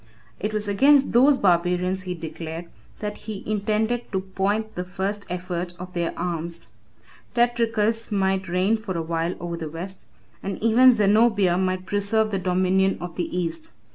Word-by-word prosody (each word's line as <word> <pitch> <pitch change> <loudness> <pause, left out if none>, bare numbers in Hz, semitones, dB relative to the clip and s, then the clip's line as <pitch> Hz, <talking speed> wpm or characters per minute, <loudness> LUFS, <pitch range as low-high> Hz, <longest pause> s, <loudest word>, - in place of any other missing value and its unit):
It 210 - -2
was 215 -1 -2
against 275 +7 +4
those 265 +4 +5
barbarians, 180 -1 +2
he 180 -1 -4
declared, 165 0 -6 0.4
that 210 -1 -3
he 205 -3 -5
intended 215 +3 -1
to 190 -2 0
point 200 +3 -1
the 180 - -3
first 195 +3 -4
effort 180 -1 -4
of 180 0 -9
their 170 -1 -1
arms. 170 -5 -4 0.7
Tetricus 230 -2 +1
might 190 -1 +1
reign 185 +5 +2
for 205 -5 -5
a - - -1
while 165 +1 -1
over 170 -1 -4
the 160 -2 -5
West, 180 +5 -7 0.4
and 195 -1 -4
even 245 +3 +6
Zenobia 205 -3 +4
might 185 0 -1
preserve 205 +2 +1
the 195 - 0
dominion 185 +1 +2
of 175 -1 -7
the 175 - -2
East. 315 - -3
190 Hz, 160 wpm, -24 LUFS, 180-215 Hz, 0.7 s, even